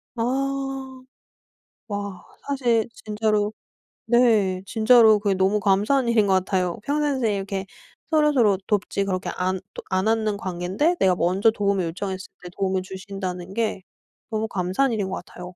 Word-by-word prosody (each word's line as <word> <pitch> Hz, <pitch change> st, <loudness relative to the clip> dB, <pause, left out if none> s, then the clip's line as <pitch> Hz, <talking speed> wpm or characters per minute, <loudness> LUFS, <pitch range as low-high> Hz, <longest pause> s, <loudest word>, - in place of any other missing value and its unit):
아. 270 Hz, +1 st, -2 dB, 0.9 s
와. 200 Hz, -3 st, -5 dB, 0.2 s
사실 240 Hz, -5 st, +1 dB, 0.2 s
진짜로 210 Hz, 0 st, 0 dB, 0.5 s
네 220 Hz, -6 st, +3 dB
진짜로 220 Hz, -1 st, +5 dB
그게 200 Hz, -2 st, +1 dB
너무 190 Hz, +3 st, +2 dB
감사한 210 Hz, +7 st, +2 dB
일인 215 Hz, -3 st, +3 dB
것 190 Hz, -, +3 dB
같아요. 185 Hz, -1 st, 0 dB
평상시에 280 Hz, -7 st, 0 dB
이렇게 195 Hz, 0 st, -3 dB, 0.4 s
서로서로 290 Hz, -, +3 dB
돕지 200 Hz, -1 st, 0 dB
그렇게 185 Hz, -2 st, -2 dB
안 185 Hz, +1 st, -1 dB
또 -, -, -7 dB
안 190 Hz, +2 st, +1 dB
하는 220 Hz, -2 st, +1 dB
관곈데 190 Hz, -, -1 dB
내가 185 Hz, -2 st, +4 dB
먼저 190 Hz, +6 st, +3 dB
도움을 200 Hz, -4 st, 0 dB
요청했을 185 Hz, +3 st, -4 dB, 0.2 s
때 180 Hz, -, -7 dB
도움을 190 Hz, -1 st, 0 dB
주신다는 190 Hz, -1 st, -6 dB
게 215 Hz, -4 st, -1 dB, 0.5 s
너무 220 Hz, 0 st, -1 dB
감사한 190 Hz, +8 st, 0 dB
일인 205 Hz, -4 st, -1 dB
것 -, -, -4 dB
같아요. 180 Hz, -, -13 dB
205 Hz, 305 characters per minute, -24 LUFS, 190-230 Hz, 0.9 s, 진짜로